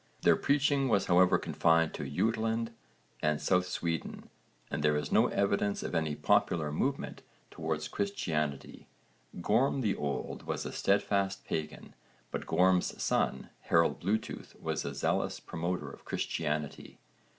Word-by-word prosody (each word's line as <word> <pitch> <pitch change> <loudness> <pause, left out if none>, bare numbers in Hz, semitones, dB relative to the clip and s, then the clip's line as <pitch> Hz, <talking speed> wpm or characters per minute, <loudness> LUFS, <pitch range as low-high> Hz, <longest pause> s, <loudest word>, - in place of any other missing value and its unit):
Their - - +6
preaching 140 -1 +2
was 100 -3 +3
however 90 0 +5
confined 80 0 +2
to 70 - -5
Jutland 115 +7 0 0.5
and 75 -1 +1
South 90 -1 +2
Sweden 85 -3 -3 0.4
and 70 - -2
there 75 0 +3
is 75 - -3
no - - +5
evidence 100 0 0
of - - -4
any 80 -2 0
popular 75 -1 +2
movement 135 - -2 0.3
towards 80 -1 -3
Christianity. 75 -8 -3 0.5
Gorm 125 +8 +2
the 105 -5 +1
Old 70 -1 -4
was - - -2
a - - -4
steadfast 100 -1 +1
pagan 80 -1 -4 0.4
but - - -4
Gorm's 90 0 +2
son 65 - 0
Harold 85 0 +2
Bluetooth 105 +5 -3
was 80 -2 -2
a 70 0 -4
zealous 70 - 0
promoter 85 +2 -3
of - - -14
Christianity. 75 -1 -3
90 Hz, 135 wpm, -31 LUFS, 75-100 Hz, 0.5 s, Their